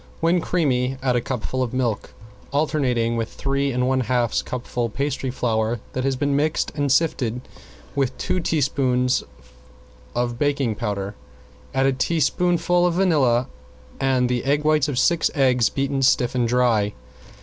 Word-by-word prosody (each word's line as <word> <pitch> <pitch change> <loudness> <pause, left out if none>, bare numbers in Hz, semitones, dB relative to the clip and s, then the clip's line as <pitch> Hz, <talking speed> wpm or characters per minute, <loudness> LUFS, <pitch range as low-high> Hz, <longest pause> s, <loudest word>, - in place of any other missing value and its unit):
When 170 +2 +2
creamy 135 -7 0
add 125 -2 +2
a 120 - +2
cupful 130 +1 -3
of 125 -1 -2
milk, 120 -5 -2 0.4
alternating 130 -6 0
with 115 0 -3
three 140 0 -1
and 125 0 0
one 130 0 +2
half 120 -1 0
cupfuls 120 -2 -3
pastry 140 -1 -2
flour 115 -2 -1
that 130 - -2
has 135 0 +1
been 140 +2 0
mixed 150 +2 0
and 145 -2 0
sifted 125 -6 +1 0.5
with 135 -2 -1
two 185 - -1
teaspoonfuls 130 -5 +1 0.9
of 120 0 -1
baking 140 -5 +1
powder. 100 -2 -3 0.6
Add 135 0 +3
a 135 - +3
teaspoonful 175 +4 +1
of 170 - -1
vanilla 140 -10 +2 0.5
and 130 -2 +2
the 125 -1 0 0.2
whites 155 -2 +3
of 140 -4 -3
six 170 +5 +3
eggs 125 -5 +3
beaten 135 0 -1
stiff 130 -2 +3
and 125 -2 +1
dry. 115 -4 +2
130 Hz, 150 wpm, -22 LUFS, 120-145 Hz, 0.9 s, Add